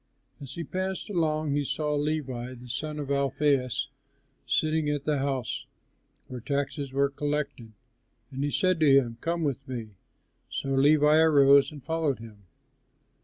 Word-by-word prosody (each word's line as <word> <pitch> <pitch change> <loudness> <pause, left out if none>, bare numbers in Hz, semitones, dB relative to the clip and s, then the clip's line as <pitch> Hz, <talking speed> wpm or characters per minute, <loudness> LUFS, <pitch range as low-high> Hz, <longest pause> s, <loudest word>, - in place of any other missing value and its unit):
As 140 -2 -9
he 170 - -4
passed 190 +5 -4
along 155 -4 0
he 145 0 +1
saw 150 +2 -1
Levi, 140 -4 -2
the 125 0 -12
son 150 +4 -4
of 145 -2 -5
Alphæus, 140 -1 +1 0.6
sitting 155 -1 +1
at 145 -1 -1
the 150 -2 +1
house 135 -3 -2 0.6
where 125 - -7
taxes 140 +2 -3
were 140 +1 +1
collected, 145 -6 -3 0.6
and 135 +1 -3
he 145 - 0
said 185 +3 +1
to 155 -3 +5
him, 120 -4 +3
"Come 170 0 -1
with 140 -5 -2
me." 120 -4 -5 0.6
So 135 - -4
Levi 150 +3 +5
arose 140 -3 +6
and 145 -3 -11
followed 160 -3 0
him. 110 -3 -13
140 Hz, 150 wpm, -27 LUFS, 135-155 Hz, 0.6 s, arose